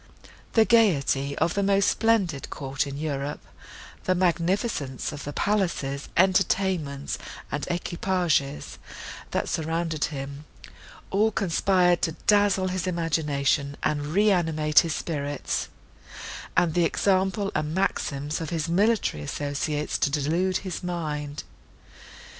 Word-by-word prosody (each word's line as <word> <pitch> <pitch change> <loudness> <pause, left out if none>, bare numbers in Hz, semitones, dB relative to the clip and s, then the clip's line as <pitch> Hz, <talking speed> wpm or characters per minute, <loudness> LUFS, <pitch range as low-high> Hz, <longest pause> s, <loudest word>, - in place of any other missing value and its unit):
The 225 -1 +5
gaiety 140 - +3
of 170 - +1
the 200 - 0
most 195 0 +3
splendid 200 - +1
court 135 0 -3
in 140 0 -6
Europe, 145 -1 -3 0.6
the 185 - +2
magnificence 175 - 0
of 145 -1 -7
the 145 - -4
palaces, 170 -8 -1
entertainments, 185 -6 +1 0.3
and 145 - -3
equipages, 175 -5 -1 0.5
that - - -1
surrounded 160 -1 -1
him—all 150 +8 -4
conspired 180 -3 +2
to 165 - 0
dazzle 205 -2 +3
his 185 0 -2
imagination, 150 -5 0
and 145 -1 0
reanimate 165 -5 +3
his 165 -2 0
spirits, 145 -3 -3 0.9
and 165 -3 +3
the 175 0 +3
example 195 +3 +1
and 155 +1 -2
maxims 150 -5 -1
of 160 - -4
his 165 -2 -2
military 200 - +2
associates 145 - -2
to - - +2
delude 165 +6 +1
his 185 -4 -4
mind. 150 -5 -4
165 Hz, 115 wpm, -26 LUFS, 145-190 Hz, 0.9 s, The